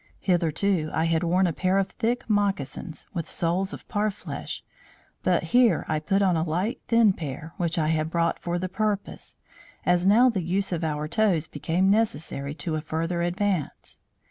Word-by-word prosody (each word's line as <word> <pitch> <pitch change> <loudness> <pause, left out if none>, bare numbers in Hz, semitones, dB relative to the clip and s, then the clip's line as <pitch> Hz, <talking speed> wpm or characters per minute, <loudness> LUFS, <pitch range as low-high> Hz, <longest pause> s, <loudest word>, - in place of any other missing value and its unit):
Hitherto, 175 -1 +1
I 160 - +2
had 165 -1 +2
worn 180 +2 +3
a 170 - 0
pair 185 +4 +1
of 195 -1 +1
thick 240 +1 -2
moccasins, 195 - -1
with 170 -4 -4
soles 180 +3 0
of - - -9
parfleche 210 -1 -3 0.6
but - - +2
here 240 -9 +4
I 155 -1 0
put 195 +6 +1
on 185 -3 +3
a 160 - +1
light 175 +8 -1
thin 230 -4 +5
pair, 155 0 -6
which 170 0 -1
I 155 -2 +1
had 155 -1 0
brought 170 0 0
for 175 0 -2
the 185 +1 -2
purpose, 205 +1 -3 0.5
as 180 +1 +3
now 230 +6 +6
the 220 -7 +1
use 190 +4 -1
of 170 -2 -2
our 150 -1 -1
toes 180 -3 +2
became 170 +6 +1
necessary 150 -9 0
to 160 +1 -4
a 155 - -1
further 165 +2 -2
advance. 180 -2 -2
175 Hz, 175 wpm, -26 LUFS, 160-200 Hz, 0.6 s, now